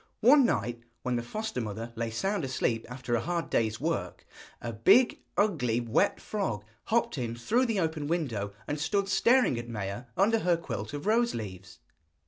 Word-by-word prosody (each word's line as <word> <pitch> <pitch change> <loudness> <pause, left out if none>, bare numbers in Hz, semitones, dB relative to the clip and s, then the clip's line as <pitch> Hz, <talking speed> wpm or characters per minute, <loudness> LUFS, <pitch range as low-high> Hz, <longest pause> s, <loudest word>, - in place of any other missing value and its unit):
One 265 +4 +7
night, 120 - -1 0.2
when 125 -1 0
the 120 - 0
foster 215 - -4
mother 115 +2 -5
lay 115 0 -2
sound 190 - -1
asleep 120 -3 -1
after 125 -1 -4
a 115 - +2
hard 170 -1 -2
day's 110 -1 +1
work, - - -2 0.3
a 115 - -5
big, 200 - +4 0.2
ugly, 140 - +2
wet 120 - +1
frog 120 - -3 0.2
hopped 230 - +1
in 115 -2 -3
through 235 - +1
the 220 -4 0
open 160 -4 -1
window 125 -12 -1 0.2
and 145 - -2
stood 195 +6 0
staring 215 - +4
at 120 0 -7
Maia 100 +1 -4
under 225 +4 +4
her 180 -4 +2
quilt 170 - -5
of 145 +3 -5
rose 235 +3 +2
leaves. 95 -4 -7
135 Hz, 175 wpm, -29 LUFS, -, 0.3 s, One